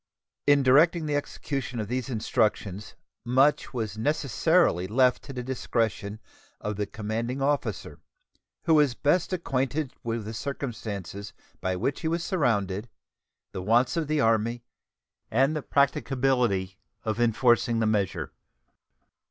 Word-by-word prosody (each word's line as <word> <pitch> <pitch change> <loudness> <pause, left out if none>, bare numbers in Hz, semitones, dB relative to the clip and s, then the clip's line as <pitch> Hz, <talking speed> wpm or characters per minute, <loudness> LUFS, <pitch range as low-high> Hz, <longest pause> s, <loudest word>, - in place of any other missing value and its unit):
In 145 -1 +5
directing 155 +5 +5
the 150 -1 -1
execution 135 -3 -3
of 105 - -3
these 125 +3 -3
instructions 105 -4 -1 0.3
much 130 +5 +3
was 110 -4 -4
necessarily 145 - +2
left 125 +4 +3
to 140 - -7
the 125 -2 -5
discretion 115 -4 -2 0.4
of 105 0 -3
the 105 0 -2
commanding 115 +4 -3
officer, 140 +1 -1 0.6
who 165 - +3
was 145 -5 +4
best 165 +9 +1
acquainted 135 -4 -1
with 115 -2 -3
the 110 - -5
circumstances 105 - -5 0.3
by 95 0 -1
which 125 +9 -2
he 160 - -1
was 165 +1 -1
surrounded, 110 - 0 0.6
the 95 - -5
wants 120 - +3
of 165 -3 -1
the 155 0 +1
Army, 115 0 +1 0.7
and 135 +7 +2
the 150 - -2
practicability 125 -9 +1 0.2
of 110 0 -2
enforcing 120 0 +3
the 115 - +1
measure. 105 -4 0
120 Hz, 130 wpm, -27 LUFS, 110-140 Hz, 0.7 s, In